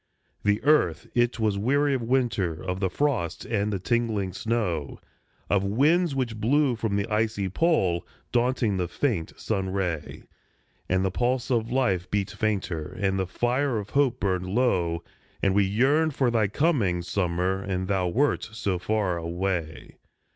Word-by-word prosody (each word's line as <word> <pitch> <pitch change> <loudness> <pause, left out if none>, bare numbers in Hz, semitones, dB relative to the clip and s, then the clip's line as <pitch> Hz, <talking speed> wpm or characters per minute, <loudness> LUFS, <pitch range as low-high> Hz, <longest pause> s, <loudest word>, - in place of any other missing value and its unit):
The 105 +1 +1
earth 125 - +3
it 120 -1 +1
was 105 -3 +1
weary 140 +6 +2
of 130 - 0
winter, 115 -9 0
of 90 0 -3
the 95 -1 0
frost 105 - -1
and 105 -2 -1
the 100 - -1
tingling 105 -2 -1
snow, 95 -9 -2 0.5
Of 100 -1 +2
winds 145 - +2
which 120 -4 -2
blew 135 +2 +3
from 110 -3 -2
the 100 0 0
icy 110 -3 0
Pole, 95 - +1 0.3
daunting 120 -4 +1
the 90 -1 -1
faint 100 - -2
sun 95 -3 -1
ray; 90 -6 -3 0.7
And 95 +1 +2
the 95 - 0
pulse 125 +5 0
of 115 -1 0
life 100 -9 +1
beat 100 -1 -1
fainter, 100 -7 -2
and 95 -1 +1
the 95 - -1
fire 125 +5 0
of 100 -2 -5
hope 135 -3 +2
burned 95 -2 -1
low, 90 -7 +1 0.4
And 100 - +3
we 100 0 +4
yearned 135 +9 +2
for 130 -3 +2
thy 110 -3 +2
coming, 105 - +1
summer, 90 +1 -1
and 95 -1 -2
thou 95 -2 +1
wert 135 +7 +1
so 100 -5 -1
far 100 -3 0
away. 85 -1 -3
105 Hz, 160 wpm, -26 LUFS, 95-125 Hz, 0.7 s, we